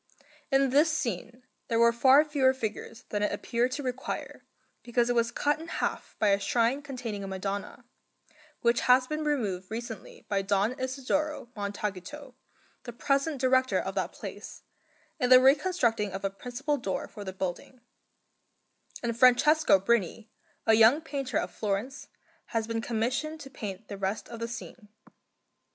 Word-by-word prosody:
In 270 -1 +3
this 300 +4 +4
scene 240 - -3 0.2
there 230 - 0
were 235 0 +5
far 265 +5 +6
fewer 270 -3 +2
figures 225 -1 -5
than 205 - -2
it 210 - +1
appeared 240 +2 -1
to 285 - -4
require, 255 0 -5 0.4
because 240 0 +1
it - - 0
was 235 0 +2
cut 295 +4 0
in 330 - -9
half - - -3
by 210 - +2
a 200 0 +3
shrine 235 +6 +1
containing 245 -7 -5
a - - -5
Madonna, 195 +5 -5 0.8
which 235 0 +3
has 250 +1 +6
been 305 +3 -3
removed 205 -12 -1
recently 225 -2 -7
by 200 -1 0
Don 200 +2 +1
Isidoro 270 +1 -2
Montaguto, 205 +6 -5 0.5
the 240 - -8
present 275 +4 0
Director 260 0 +3
of - - -4
that - - -2
place, - - -9 0.6
in 250 -3 +1
the 255 0 +10
reconstructing 260 - +2
of 195 +1 -4
a 195 - 0
principal 250 +8 -3
door 195 -7 -3
for 205 - -9
the 190 - -5
building; 190 +7 -5 1.2
and 235 -1 -1
Francesco 255 +1 +5
Brini, 215 +1 0 0.4
a 225 - +5
young 225 +7 +6
painter 275 -6 -3
of - - -2
Florence, 215 +6 -3 0.4
has 225 -1 -2
been 225 0 -2
commissioned 250 +8 -2
to 270 - -10
paint 205 -4 -7
the 200 - -7
rest 195 +2 -2
of 235 - -8
the 230 - -3
scene. 235 -2 -9
240 Hz, 160 wpm, -28 LUFS, 210-270 Hz, 1.2 s, the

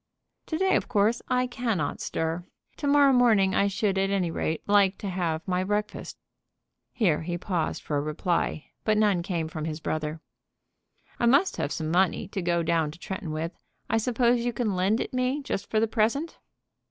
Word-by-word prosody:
"To 315 - -2
day, 380 +2 +3
of - - 0
course, 215 +3 +2
I 250 0 +2
cannot 230 - -2
stir. 165 +2 -2 0.3
To 290 - -3
morrow 285 -1 +5
morning 220 -6 +4
I 200 - +3
should, 195 0 0
at 195 0 +1
any 190 -4 0
rate, 160 -1 -2
like 200 -1 +4
to 200 - -5
have 170 -3 -2
my 185 0 +1
breakfast." 210 +2 -3 0.7
Here 195 -12 +1
he 175 +1 -3
paused 175 -3 -2
for 150 - -1
a - - +1
reply, 155 +1 -1 0.2
but 215 -1 +2
none 205 -5 +3
came 170 -3 -2
from 155 -1 -5
his 155 -1 -4
brother. 155 0 -3 1.0
"I 235 - +3
must 280 +10 +4
have 145 - -2
some 160 -1 -2
money 180 0 +2
to 195 - -3
go 170 -1 +1
down 165 -2 +1
to 155 - -10
Tretton 190 -1 -5
with; 160 +2 -3 0.4
I 225 - +3
suppose 240 +1 +2
you 240 0 -1
can 220 -6 -1
lend 195 +5 +2
it - - -4
me 255 +3 0
just 195 - -4
for 220 - +2
the 225 - +2
present?" 235 +9 0
195 Hz, 190 wpm, -27 LUFS, 170-235 Hz, 1.0 s, morrow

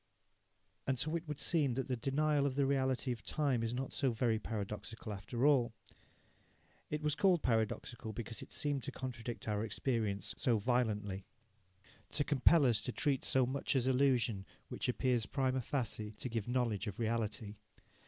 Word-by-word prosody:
And 130 - +1
so 155 +6 +1
it 170 0 -3
would 150 -1 -4
seem 145 -8 +2
that 135 - -2
the 130 - 0
denial 140 +3 +1
of 130 - -2
the 140 0 +3
reality 130 -1 +1
of 115 -3 -4
time 140 -3 +1
is 115 0 -1
not 130 +2 -3
so 135 - +2
very 115 -1 +1
paradoxical 110 +1 -5
after 120 +6 -2
all. 130 -6 +4 1.2
It 150 0 -3
was 150 -1 +2
called 180 0 +3
paradoxical 110 0 -1
because 115 +1 -6
it - - -10
seemed 145 -2 -1
to 140 - -5
contradict 120 -4 -6
our 105 0 0
experience 110 -3 -1
so 120 -3 +2
violently 105 -4 0 0.9
to 145 - +3
compel 145 +2 +5
us 115 -4 +3
to 125 - -2
treat 135 +1 0
so 130 -1 +4
much 135 +3 -1
as 130 -2 +3
illusion 125 -6 +2 0.2
which - - -2
appears 125 -3 +1
prima 130 -2 0
facie 110 -5 -2
to 125 - -3
give 115 -2 -2
knowledge 120 -4 0
of 100 - -4
reality. 110 -2 -2
125 Hz, 170 wpm, -35 LUFS, 110-135 Hz, 1.2 s, compel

